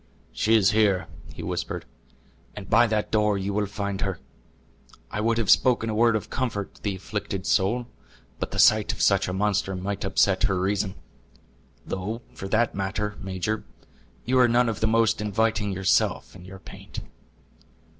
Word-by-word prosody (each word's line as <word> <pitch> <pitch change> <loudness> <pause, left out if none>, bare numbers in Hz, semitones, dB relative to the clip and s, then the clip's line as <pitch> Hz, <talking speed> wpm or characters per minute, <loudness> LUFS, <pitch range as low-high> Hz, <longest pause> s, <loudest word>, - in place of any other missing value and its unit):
"She 110 +1 +2
is 105 -1 +4
here," 105 -4 +2 0.3
he - - -9
whispered, - - -4 0.7
"and 100 -2 -8
by 120 +2 +5
that 110 -1 -1
door 105 -2 +2
you 100 +1 -3
will 105 0 0
find 100 -1 -4
her. 95 -3 -2 0.9
I 105 - -2
would 115 +1 +1
have 115 -4 +2
spoken 120 -3 +3
a - - -2
word 115 +1 +3
of 110 - -4
comfort 115 -7 -3
to - - -21
the 100 -2 -2
afflicted 100 0 -5
soul; 110 +5 +1 0.5
but - - -3
the - - -6
sight 110 -1 +5
of - - -9
such 100 -1 +3
a - - -2
monster 100 0 0
might 95 +2 -4
upset - - +2
her 95 -1 +1
reason. 100 +1 -1 0.9
Though 105 +6 -4
for 95 - -7
that 115 +3 +1
matter, 100 +2 -3
major, 95 +3 -3 0.6
you 130 +1 +2
are 125 - +6
none 120 0 +3
of 110 - -3
the 110 - +1
most 115 -1 +2
inviting 105 0 0
yourself 95 0 +1
in 90 -1 -12
your 95 +1 -10
paint." - - -10
105 Hz, 175 wpm, -25 LUFS, 95-110 Hz, 0.9 s, are